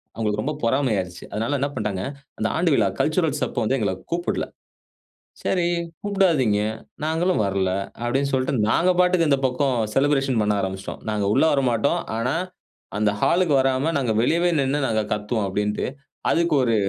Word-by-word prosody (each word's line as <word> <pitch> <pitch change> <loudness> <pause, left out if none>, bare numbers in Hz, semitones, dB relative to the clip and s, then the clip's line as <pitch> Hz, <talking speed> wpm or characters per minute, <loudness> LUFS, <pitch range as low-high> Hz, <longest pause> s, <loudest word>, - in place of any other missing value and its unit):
அவுங்களுக்கு 105 -2 -1
ரொம்ப 150 - -1
பொறாமையாயிருச்சு. 110 -8 0
அதனால 115 +7 -1
என்ன 140 +2 0
பண்ட்டாங்க, 105 -5 -2 0.4
அந்த 110 - +1
ஆண்டு 170 +1 +2
விழா 110 -7 +3
கல்ச்சுரல்ஸ் 155 -2 +1
அப்போ - - -4
வந்து 130 +5 +1
எங்கள 100 -4 0 0.2
கூப்பிடல. 175 +1 -1 1.0
சரி 180 -2 +1 0.4
கூப்டாதீங்க. 165 - +2 0.4
நாங்களும் 165 -1 +1
வரல்ல 95 -1 0 0.3
அப்டின்னு 135 +3 0
சொல்ட்டு, 130 +1 +1 0.2
நாங்க 180 +9 +3
பாட்டுக்கு 180 -2 +4
இந்த 140 -2 +3
பக்கம் 130 0 +1 0.2
செலிபிரேஷன் 135 -3 +2
பண்ண 105 0 +2
ஆரம்பிச்சுட்டோம். 95 0 -5
நாங்க 105 -2 0
உள்ளே 160 - +4
வரமாட்டோம். 125 -5 +1 0.2
ஆனா 125 +6 0 0.6
அந்த 105 -1 +2
ஹாலுக்கு 175 -3 +3
வராம 135 +4 +1
நாங்க 125 -5 0
வெளியவே 170 +8 +2
நின்னு 140 +1 +1
நாங்க 110 -1 +1
கத்துவோம் 105 +1 -2
அப்டின்ட்டு, 105 +2 -1 0.4
அதுக்கு 170 -1 +2
ஒரு 115 -2 +2
130 Hz, 150 wpm, -23 LUFS, 105-155 Hz, 1.0 s, பாட்டுக்கு